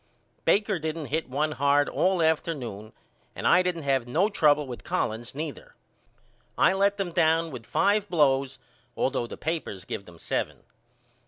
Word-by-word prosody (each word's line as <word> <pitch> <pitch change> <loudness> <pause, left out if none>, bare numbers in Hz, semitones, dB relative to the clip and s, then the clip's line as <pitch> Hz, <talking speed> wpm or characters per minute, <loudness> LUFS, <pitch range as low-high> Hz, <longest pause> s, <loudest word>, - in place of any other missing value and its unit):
Baker 205 -2 +2
didn't 160 0 -3
hit 160 -3 -1
one 150 +4 0
hard 145 0 +2
all 185 -2 +1
afternoon 135 -10 -1 0.4
and - - -1
I 180 - +6
didn't 180 -3 -2
have 135 -3 +1
no 175 - +2
trouble 150 -7 +3
with 125 -3 -8
Collins 115 +4 -2
neither. 150 0 -6 0.8
I - - +5
let 200 +1 +2
them 195 -3 -2
down 165 -1 +2
with 120 -4 -9
five 205 0 +2
blows 135 -5 +2 0.4
all 130 - +1
though 125 -3 -2
the - - -8
papers 155 - -4
give 100 - -5
them 85 -1 -14
seven. - - -3
155 Hz, 160 wpm, -27 LUFS, 130-175 Hz, 0.8 s, I